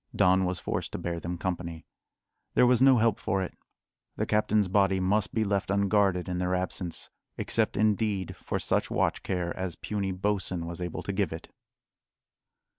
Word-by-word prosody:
Don 95 +1 +4
was 90 -1 -1
forced - - -3
to - - -2
bear 85 -1 -3
them 85 +1 -4
company. 85 -2 -4 0.7
There - - +6
was 125 0 +4
no 135 -1 +7
help 115 -2 +2
for 95 -3 0
it; 90 - -6 0.6
the - - -1
captain's 105 -1 +2
body 95 0 +3
must 95 +2 +1
be 110 - +1
left 100 -2 -1
unguarded 100 -2 +2
in 90 -1 -2
their 90 0 0
absence 90 -2 -3 0.3
except, - - +1
indeed, 105 -3 +1
for - - -3
such - - 0
watch - - 0
care 90 -2 -2
as 95 -3 -3
puny 100 -2 -3
Bosin 95 -2 -1
was 85 +1 -4
able 90 -2 -4
to 100 - -3
give 95 -4 0
it. 80 - -7
95 Hz, 175 wpm, -28 LUFS, 90-105 Hz, 0.7 s, no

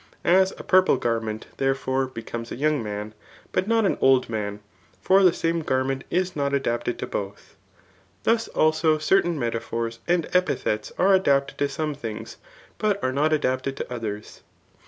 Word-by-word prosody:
As 190 +2 +4
a - - -8
purple 185 -6 +4
garment, 115 -2 -2
therefore, 135 -1 0
becomes 115 -1 -7
a - - -3
young, 150 0 +1 0.7
but 185 +2 0
not 225 -1 +3
an - - 0
old 130 -1 +4
mm 105 -2 -3
i - - -20 0.4
for 190 +1 +4
the 185 -2 +6
same 165 0 -1
garment 130 -2 -1
is 185 +1 0
not 140 -1 0
adapted 120 -2 -1
to - - -4
both; 100 0 -6 0.7
thus 230 0 +2
also 155 0 +2
certain 170 +1 +2
metaphors 115 -1 -3
and 175 -2 +1
epithets 110 -12 0
are 195 +2 +4
adapted 140 -7 +2
t9.some 145 +2 -1
things, 115 -7 -7 0.4
but 210 -2 +1
are 130 - 0
not 150 +3 +2
adapted 135 -2 0
to - - -5
others. 105 -3 -6
140 Hz, 155 wpm, -24 LUFS, 120-175 Hz, 0.7 s, the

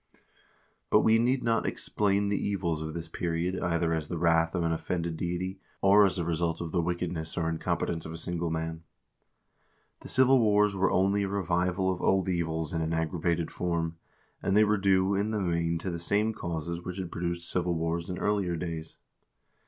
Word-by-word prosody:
2 - - -21 0.7
But - - +6
we 110 0 +4
need 125 +2 +2
not 115 -1 +1
explain 100 -1 0
the 100 - +1
evils 90 -6 -1
of 80 0 -5
this 85 0 -5
period 85 +2 -2
either 85 -1 +1
as 80 -2 -2
the 85 - -4
wrath 85 0 +2
of 90 - 0
an 85 - +1
offended 85 0 -2
deity, 90 +3 -3 0.2
or 100 +1 +6
as 95 - -3
the 85 -3 -2
result 85 0 -1
of 85 -2 -4
the 90 - +1
wickedness 85 -1 -3
or 80 -2 0
in 80 0 -2
competence 80 -1 -1
of 80 - -7
a 80 - -6
single 85 0 -2
man. 80 0 -3 1.2
The - - -11
civil 130 0 +4
wars 105 -2 +4
were 95 -1 +2
only 100 +2 +2
a 100 - 0
revival 95 -1 0
of 90 - -7
old 95 0 +2
evils 80 -3 -1
in 80 - 0
an 80 +1 -1
aggravated 80 0 -1
form, 85 -2 -2 0.4
and 100 +1 +1
they 110 - +7
were 105 0 +2
due, 95 0 +3
in 100 +2 0
the 110 -1 -1
main, 85 -2 0
to 90 +3 -4
the 85 - -4
same 105 +6 +1
causes 85 -3 -4
which 90 +1 -6
had 90 -3 -5
produced 85 0 -3
civil 90 -1 0
wars 85 +1 -2
in 90 - -3
earlier 100 -4 0
days. 80 -1 -5
85 Hz, 200 wpm, -29 LUFS, 85-95 Hz, 1.2 s, they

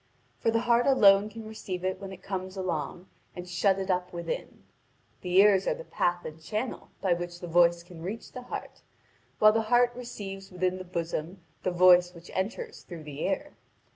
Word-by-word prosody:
For - - +1
the 225 0 +2
heart 240 +1 +3
alone 205 -6 +6
can 220 0 -9
receive 190 -4 -6
it 185 +1 -2
when 195 -1 -6
it 190 -1 -11
comes 190 0 -4
along, 175 -1 -3 0.3
and 180 0 -7
shut 195 +2 +2
it 190 0 -1
up 180 0 -1
within. 170 -1 -5 0.6
The 180 -1 -3
ears 195 -1 +5
are - - +2
the - - -8
path 175 - -1
and 155 +1 -8
channel 215 +9 -4
by 190 -3 +3
which 175 0 -5
the 175 - -7
voice 170 0 +4
can 175 -2 -12
reach 200 +7 -6
the 255 - -7
heart, 250 - -7 0.6
while 215 0 +7
the 225 - +2
heart 245 0 +4
receives 195 -6 -7
within 185 0 -1
the - - -5
bosom 170 0 -4 0.2
the - - 0
voice 180 0 +5
which 170 +1 -12
enters 240 - -3
through 170 -3 -9
the 150 0 -7
ear. - - -2
185 Hz, 195 wpm, -28 LUFS, 175-215 Hz, 0.6 s, while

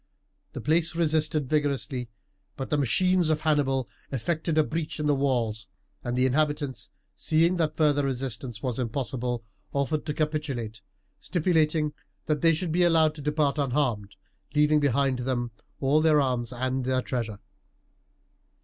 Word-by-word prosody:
The - - -5
place 165 +2 +1
resisted 155 -3 +1
vigourously, 140 -4 -1 0.5
but 135 - -5
the 150 - +3
machines 180 +6 +3
of 155 -1 +1
Hannibal 135 -5 +1 0.2
effected 155 +5 -1
a 155 - +6
breach 160 +1 -3
in 150 - -1
the 145 - +3
walls, 120 -6 0 0.4
and 120 0 -2
the 130 - +3
inhabitants, 145 -1 0 0.3
seeing 165 +3 +2
that 155 -2 0
further 145 -2 +3
resistance 125 -3 -3
was 125 -2 -1
impossible, 125 -1 -2 0.3
offered 145 +3 -1
to 150 - -1
capitulate, 140 -9 -2 0.4
stipulating 155 - +1 0.3
that 150 -2 0
they 165 -1 +5
should 170 +1 -2
be 175 +3 +2
allowed 165 -3 +4
to 155 - -9
depart 150 0 +1
unharmed, 125 -8 0 0.4
leaving 150 +1 +4
behind 135 -2 +1
them 120 -1 -2 0.3
all 145 +3 +3
their 155 -1 +5
arms 125 -4 0
and 130 +1 -2
their 130 0 0
treasure. 115 -5 -3
145 Hz, 145 wpm, -27 LUFS, 125-155 Hz, 0.5 s, a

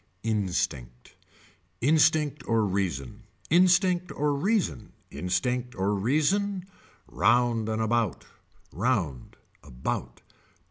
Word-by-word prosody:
Instinct. 85 - -2 0.7
Instinct 150 +1 +3
or 115 -2 +2
reason. 90 -10 -3 0.3
Instinct 180 0 +3
or 145 0 0
reason. 180 - -1 0.2
Instinct 125 +8 -2
or 95 +2 0
reason. 175 - 0 0.4
Round 120 -3 +2
and 110 0 -1
about. 115 -3 0 0.5
Round. 90 - -2 0.3
About. 65 -3 -5
115 Hz, 85 wpm, -27 LUFS, 95-155 Hz, 0.7 s, Instinct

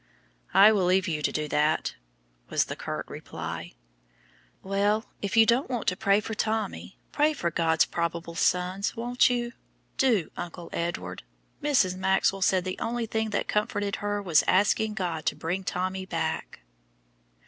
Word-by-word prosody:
"I 200 +3 +9
will 200 -4 +2
leave 185 +1 +3
you 155 -3 -1
to - - +1
do 150 0 -2
that," 150 +2 +1 0.6
was - - +2
the - - -5
curt - - -5
reply. - - -7 0.9
"Well, 205 +3 +1 0.2
if 200 +2 -2
you 225 - +8
don't 240 +5 +2
want 245 -4 -2
to 185 - -3
pray 200 +2 +3
for 220 - -5
Tommy, 210 - -2
pray 300 +1 +2
for 170 - -2
God's 165 -1 +3
probable 170 0 -3
sons, 180 +5 0
won't 245 +2 +2
you? 240 -1 -1 0.4
Do, 230 - +2
Uncle 175 0 -7
Edward. 170 +1 -3 0.4
Mrs. 255 -11 +2
Maxwell 190 +1 +1
said 185 -1 +3
the 185 - -4
only 235 0 -2
thing 220 0 -1
that 210 - -1
comforted 205 -1 -1
her 205 -1 -3
is 160 -3 +5
asking 210 +2 +2
God 175 -6 -2
to - - +1
bring 180 +4 -3
Tommy 185 +1 -3
back." - - -3
195 Hz, 160 wpm, -27 LUFS, 175-220 Hz, 0.9 s, I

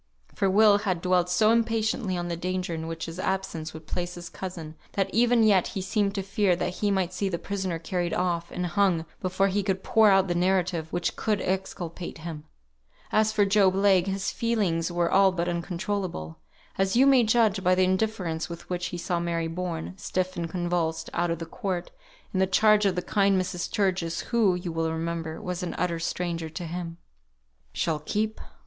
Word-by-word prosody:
For 195 - +1
Will 205 +1 +6
had 185 -4 -1
dwelt 180 0 +2
so 215 +4 +4
impatiently 225 -3 +1
on 175 0 -3
the 170 - -2
danger 180 0 -3
in 160 0 -4
which 165 0 -4
his 165 +2 -7
absence 185 -5 -2
would 160 0 -10
place 175 +2 -4
his 175 -1 -8
cousin, 170 -5 -7 0.2
that 195 -1 -1
even 240 0 +4
yet 200 -4 +4
he - - -1
seemed 200 +1 0
to 195 - -2
fear 195 -1 +2
that 180 +1 -3
he 205 - +1
might 190 -2 0
see 195 +2 -1
the 170 - -2
prisoner 190 -1 -3
carried 175 +1 -2
off, 175 -2 -1
and 180 - -3
hung, 175 -3 +1 0.2
before 185 +1 +1
he 200 +2 +1
could 190 -1 -2
pour 220 -1 +5
out 195 -1 +4
the 175 - 0
narrative 180 -2 0
which 175 0 0 0.2
would 210 -2 +3
exculpate 180 -2 -4
him. 160 -2 -7 0.7
As 215 0 +3
for 210 -1 +3
Job 195 -2 +4
Legh, 195 -2 +4
his 195 0 -1
feelings 195 -8 0
were 175 -1 0
all 195 0 +5
but 175 -1 -2
uncontrollable; 175 - -3 0.4
as 195 +1 +2
you 260 +3 +6
may 270 -2 +6
judge 220 -3 +2
by 185 0 +4
the 185 - +3
indifference 185 -4 -1
with 170 0 -8
which 175 -1 -1
he 175 - -5
saw 175 0 -1
Mary 170 -1 -1
borne, 170 0 -4
stiff 185 0 -2
and 170 -2 -3
convulsed, 170 -2 -1
out 175 0 0
of 165 - -1
the 165 - -6
court, 180 0 -4 0.4
in 185 - 0
the 190 - +3
charge 210 +2 +4
of 190 - 0
the 180 - -2
kind 200 -2 +2
Mrs. 180 -1 -3
Sturgis, 185 -4 0
who, 220 -6 +2
you 180 -1 -4
will 165 0 -1
remember, 165 0 -3
was 180 0 -4
an 180 - -4
utter 170 -1 -1
stranger 170 -1 -3
to 160 +3 -6
him. 170 0 -5 0.7
"She'll 160 -3 -1
keep! 215 +7 -2
180 Hz, 200 wpm, -27 LUFS, 170-195 Hz, 0.7 s, Will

